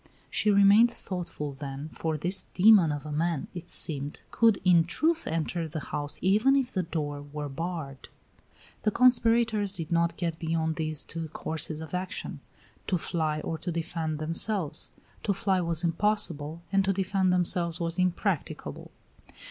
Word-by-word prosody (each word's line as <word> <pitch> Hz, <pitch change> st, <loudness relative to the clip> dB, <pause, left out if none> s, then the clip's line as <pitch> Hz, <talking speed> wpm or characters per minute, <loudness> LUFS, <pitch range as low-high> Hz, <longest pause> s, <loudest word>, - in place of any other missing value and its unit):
She 215 Hz, -, +1 dB
remained 200 Hz, +3 st, +6 dB
thoughtful, 175 Hz, -9 st, -5 dB
then, 140 Hz, +1 st, -6 dB
for 160 Hz, 0 st, -3 dB
this 180 Hz, +5 st, 0 dB
demon 190 Hz, -4 st, +7 dB
of 145 Hz, 0 st, -4 dB
a 150 Hz, -, -5 dB
man, 160 Hz, -1 st, -1 dB
it 175 Hz, -1 st, -8 dB
seemed, 145 Hz, -2 st, 0 dB
could 225 Hz, -3 st, +4 dB
in 175 Hz, -2 st, +6 dB
truth 320 Hz, -, 0 dB
enter 165 Hz, +1 st, -2 dB
the 155 Hz, +1 st, -5 dB
house 145 Hz, 0 st, -2 dB
even 215 Hz, +9 st, +4 dB
if 260 Hz, -2 st, +1 dB
the 185 Hz, -, 0 dB
door 150 Hz, -4 st, -3 dB
were 145 Hz, +1 st, -6 dB
barred. 150 Hz, -2 st, -5 dB, 0.7 s
The -, -, +2 dB
conspirators 230 Hz, -4 st, +3 dB
did 165 Hz, -2 st, -6 dB
not 170 Hz, 0 st, +1 dB
get 165 Hz, -2 st, -2 dB
beyond 160 Hz, -1 st, -1 dB
these 155 Hz, -2 st, -2 dB
two 165 Hz, 0 st, -5 dB
courses 155 Hz, 0 st, -4 dB
of 160 Hz, 0 st, -8 dB
action: 185 Hz, +2 st, -4 dB, 0.5 s
to 185 Hz, -, +1 dB
fly 155 Hz, -2 st, -1 dB
or 160 Hz, -, -4 dB
to 175 Hz, -, -3 dB
defend 165 Hz, -1 st, -3 dB
themselves. 165 Hz, +1 st, 0 dB, 0.3 s
To 200 Hz, -, 0 dB
fly 190 Hz, -1 st, +1 dB
was 165 Hz, -1 st, -1 dB
impossible, 170 Hz, -3 st, 0 dB
and 195 Hz, 0 st, +3 dB
to 195 Hz, 0 st, +1 dB
defend 190 Hz, 0 st, +1 dB
themselves 175 Hz, -1 st, +1 dB
was 170 Hz, +1 st, -2 dB
impracticable. 185 Hz, -1 st, -2 dB
170 Hz, 155 wpm, -28 LUFS, 155-195 Hz, 0.7 s, demon